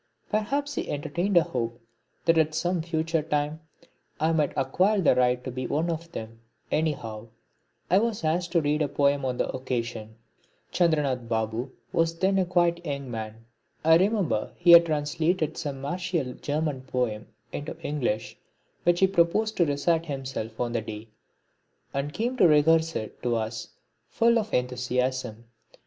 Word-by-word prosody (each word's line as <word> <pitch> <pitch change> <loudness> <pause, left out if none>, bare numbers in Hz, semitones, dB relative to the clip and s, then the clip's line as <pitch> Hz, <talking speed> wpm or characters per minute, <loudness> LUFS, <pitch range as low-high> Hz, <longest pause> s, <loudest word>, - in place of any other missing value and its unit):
Perhaps 280 +8 0
he - - -3
entertained 170 +6 0
a 170 - +7
hope 120 -7 -3 0.5
that 165 - +5
at 155 -1 +1
some 175 +1 0
future 160 0 -1
time 150 0 -1 0.6
I 160 +2 +2
might 155 -3 +2
acquire 185 +10 +2
the 175 - +5
right 125 0 +2
to 130 - -5
be 130 0 -4
one 165 +4 0
of 165 +1 -5
them; 115 0 -7 0.3
anyhow 120 -9 -2 0.6
I 185 - +4
was 220 -4 -1
asked 170 +3 0
to 170 - +4
read 150 +1 +1
a 150 - +2
poem 140 0 +1
on 125 -1 -1
the - - 0
occasion. 120 -4 -4 0.6
Chandranath 145 -8 +1
Babu 110 +2 -1 0.2
was 165 0 +1
then 190 +1 +2
quite 175 -1 +2
a 150 -4 -2
young 140 -3 -6
man. 110 0 -6 0.4
I 160 0 +7
remember 190 - 0
he 175 0 +5
had 170 0 +9
translated 155 +2 0
some 140 -4 -5
martial 170 -3 -2
German 145 -1 -2
poem 125 -5 -2 0.2
into 145 - -5
English 120 -7 -2 0.4
which 175 +1 +3
he - - +8
proposed 195 +5 +2
to 170 - +3
recite 160 +4 +1
himself 130 -6 -5
on 120 -1 -1
the 115 -1 -1
day, 110 0 -8 0.8
and 140 +1 -2
came 240 +9 -2
to 180 - +6
rehearse 160 +1 +4
it 110 - -5
to 120 -1 0
us 110 0 -3 0.4
full 235 0 +3
of 220 -1 -4
enthusiasm. 125 -2 -1
150 Hz, 160 wpm, -27 LUFS, 125-170 Hz, 0.8 s, had